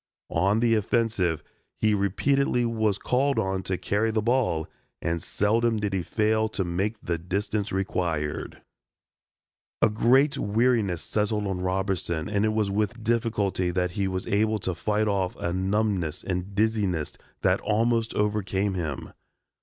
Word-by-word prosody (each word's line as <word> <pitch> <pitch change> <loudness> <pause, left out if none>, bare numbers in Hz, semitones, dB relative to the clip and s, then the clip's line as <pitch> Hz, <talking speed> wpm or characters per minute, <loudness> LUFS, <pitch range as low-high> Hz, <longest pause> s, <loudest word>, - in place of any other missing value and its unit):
On 100 +6 +2
the 120 -1 +3
offensive 105 -7 +1 0.3
he 110 -1 +2
repeatedly 120 +6 +1
was 110 -3 +1
called 135 +5 +1
on 95 0 0
to 95 -1 -2
carry 105 +5 0
the 110 0 0
ball 115 -10 +1 0.3
and 85 0 -2
seldom 115 +3 +1
did 105 -2 -2
he 95 - +1
fail 110 +4 +1
to 105 -3 -2
make 95 +5 -2
the 85 -1 -1
distance 100 +4 -2
required. 85 -6 -2 1.2
A - - +4
great 130 +6 +3
weariness 105 -4 +1
settled 105 0 -1
on 95 -2 -2
Robertson 90 -3 -1
and 105 0 +1
it 110 - +1
was 105 -2 0
with 110 +3 -1
difficulty 110 -5 0
that 90 0 0
he 100 +1 -1
was 95 0 -3
able 110 +2 +1
to 95 -2 -2
fight 105 +5 0
off 95 -3 0
a 85 - -3
numbness 95 -3 0
and 95 +1 -3
dizziness 105 -7 0 0.3
that - - +3
almost 115 +1 +1
overcame 100 -1 0
him. 80 -7 -4
105 Hz, 145 wpm, -26 LUFS, 95-110 Hz, 1.2 s, A